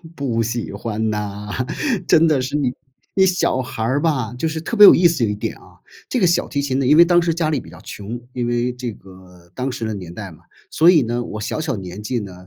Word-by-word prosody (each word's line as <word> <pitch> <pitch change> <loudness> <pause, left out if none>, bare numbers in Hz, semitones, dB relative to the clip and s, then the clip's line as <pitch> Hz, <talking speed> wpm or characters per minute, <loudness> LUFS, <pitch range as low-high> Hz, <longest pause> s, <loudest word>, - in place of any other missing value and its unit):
不 120 -5 -1
喜 115 -1 -3
欢 110 +1 -3
呐， 105 -1 -4 0.6
真 165 +1 +5
的 145 -4 +2
是， 135 +3 -3
你 130 -4 0 0.4
你 190 -1 +5
小 180 -8 +1
孩 125 -3 -7
儿 130 +5 0
吧， 130 -8 0
就 145 +6 -2
是 160 0 -4
特 230 +6 -4
别 210 - +10
有 - - +10
意 175 0 +5
思 165 -8 0
有 105 - +1
一 105 - -2
点 105 - -4
啊， - - -20 0.3
这 250 - 0
个 180 - +4
小 175 - +1
提 140 -2 -2
琴 135 -2 -1
呢， 135 - 0
因 150 - +6
为 170 - +10
当 175 0 +4
时 170 -1 0
家 165 -2 -1
里 150 -4 0
比 - - -12
较 90 - -13
穷， 110 +4 -7
因 120 -1 -2
为 120 +1 0
这 125 -1 -5
个 90 -2 -17
当 130 +1 -2
时 115 -1 -5
的 110 - -3
年 90 -4 -8
代 100 -3 -7
嘛。 80 - -17 0.3
所 165 +2 +4
以 160 -5 +5
呢， 120 +1 -2
我 110 -2 -7
小 115 - -3
小 150 -6 -2
年 95 +2 -8
纪 120 +2 -2
呢， 100 -3 -8
125 Hz, 280 characters per minute, -20 LUFS, 105-155 Hz, 0.6 s, 别